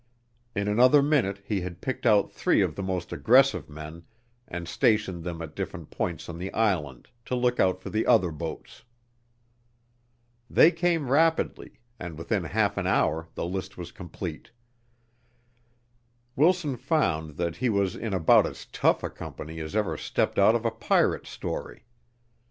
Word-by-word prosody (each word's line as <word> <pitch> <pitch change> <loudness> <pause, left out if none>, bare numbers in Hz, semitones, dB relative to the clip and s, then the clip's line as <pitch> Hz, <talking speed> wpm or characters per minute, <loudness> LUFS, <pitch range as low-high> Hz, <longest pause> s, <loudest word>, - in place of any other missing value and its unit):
In 100 0 -1
another 125 +7 +5
minute 115 -10 +1
he 100 -3 -1
had 90 -1 -6
picked 130 -1 -3
out 105 -3 +4
three - - +2
of - - -1
the - - -6
most 95 -2 -3
aggressive 135 - +4
men 75 +2 -9 0.5
and 85 0 -6
stationed 95 -2 +1
them 85 -1 -5
at 80 - -9
different - - -6
points 85 -4 -3
on 85 -1 -7
the 95 +2 -4
island 85 - -1 0.2
to 125 - -2
look 125 0 +1
out 95 -1 +3
for - - -8
the 110 - 0
other 90 -2 +4
boats. 80 +7 -7 1.7
They 165 - +6
came 165 -5 0
rapidly, 160 +3 +1 0.2
and 85 -3 -7
within 90 +2 -2
half 100 +3 0
an 95 -2 -1
hour 80 -3 +1
the - - -3
list 95 +2 -5
was 85 -1 -7
complete. 85 -2 -7 1.9
Wilson 155 -3 +2
found 85 - 0
that 85 -1 -2
he 130 - 0
was 100 -3 +1
in 115 - -4
about 90 -4 +5
as - - -9
tough - - +1
a - - -2
company 80 +1 -8
as 80 +5 -6
ever 105 -2 0
stepped - - -1
out 105 +3 +6
of 120 0 -2
a 115 - +2
pirate 115 0 +1
story. - - -6
95 Hz, 160 wpm, -27 LUFS, 85-120 Hz, 1.9 s, They